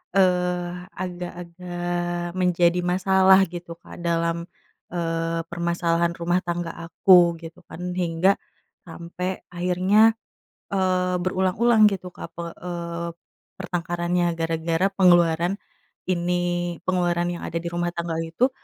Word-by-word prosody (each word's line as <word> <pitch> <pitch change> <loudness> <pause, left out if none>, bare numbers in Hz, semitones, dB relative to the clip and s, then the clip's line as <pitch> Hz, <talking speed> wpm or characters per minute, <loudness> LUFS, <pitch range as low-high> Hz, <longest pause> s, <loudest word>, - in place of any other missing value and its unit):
eee, 180 -2 +2 0.2
agak-agak 175 -1 -4
menjadi 180 -1 +3
masalah 190 +1 +5
gitu, 175 -1 -7
Kak, - - -12
dalam, 170 0 0 0.5
eee, 165 -1 -1
permasalahan 170 0 0
rumah 175 +1 +1
tangga 175 -1 -2
aku, 170 +1 +4
gitu 165 +2 -11
kan. 180 +1 -6
Hingga 180 +2 +2 0.5
sampai 180 +3 -5
akhirnya, 185 +5 +3 0.6
eee, 185 -1 +1
berulang-ulang 200 +5 +3
gitu, 185 -2 -5
Kak, - - -8
pe 170 - -5
eee, 170 -1 -5 0.5
pertengkarannya 175 0 -1
gara-gara 165 +2 0
pengeluaran 175 -2 +4 0.5
ini. 175 -1 -1
Pengeluaran 175 -1 +1
yang 175 - -6
ada 165 - -2
di 170 - -3
rumah 175 0 -1
tangga 170 -1 -3
itu 170 +11 +1
175 Hz, 110 wpm, -24 LUFS, 170-180 Hz, 0.6 s, masalah